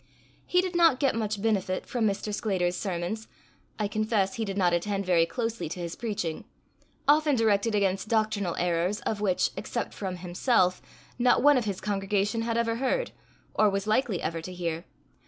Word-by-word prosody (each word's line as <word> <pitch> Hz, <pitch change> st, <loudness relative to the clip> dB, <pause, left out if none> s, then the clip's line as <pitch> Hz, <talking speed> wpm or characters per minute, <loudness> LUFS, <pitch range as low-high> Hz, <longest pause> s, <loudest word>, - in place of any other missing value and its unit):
He 360 Hz, -, +4 dB
did 370 Hz, -1 st, -4 dB
not 330 Hz, -7 st, +5 dB
get 275 Hz, -3 st, +2 dB
much 215 Hz, -2 st, -2 dB
benefit 195 Hz, -4 st, 0 dB
from 235 Hz, -3 st, 0 dB
Mr. 205 Hz, +1 st, -2 dB
Sclater's 185 Hz, -4 st, 0 dB
sermons: 190 Hz, +4 st, -3 dB, 0.5 s
I 210 Hz, -, 0 dB
confess 215 Hz, -2 st, 0 dB
he 225 Hz, -, -2 dB
did 195 Hz, -1 st, -4 dB
not 180 Hz, -3 st, +3 dB
attend 195 Hz, +3 st, -1 dB
very 170 Hz, -2 st, +3 dB
closely 225 Hz, 0 st, -3 dB
to 180 Hz, -, -6 dB
his 170 Hz, -1 st, -4 dB
preaching 205 Hz, -8 st, -3 dB, 0.6 s
often 300 Hz, 0 st, +4 dB
directed 220 Hz, -1 st, +2 dB
against 195 Hz, -1 st, +1 dB
doctrinal 215 Hz, -5 st, 0 dB
errors 175 Hz, +3 st, 0 dB
of 210 Hz, -2 st, -2 dB
which, 190 Hz, -3 st, +1 dB
except -, -, -4 dB
from 190 Hz, -3 st, -4 dB
himself, 180 Hz, +2 st, +1 dB, 0.4 s
not 245 Hz, +1 st, +4 dB
one 290 Hz, 0 st, +7 dB
of 250 Hz, -3 st, +1 dB
his 200 Hz, -3 st, -2 dB
congregation 205 Hz, +2 st, 0 dB
had 230 Hz, 0 st, -1 dB
ever 230 Hz, 0 st, 0 dB
heard, 270 Hz, -, 0 dB, 0.4 s
or 215 Hz, -1 st, +4 dB
was 195 Hz, 0 st, -2 dB
likely 215 Hz, -3 st, +1 dB
ever 165 Hz, 0 st, -2 dB
to 185 Hz, -, -7 dB
hear. 170 Hz, -1 st, -3 dB
205 Hz, 175 wpm, -28 LUFS, 185-230 Hz, 0.6 s, one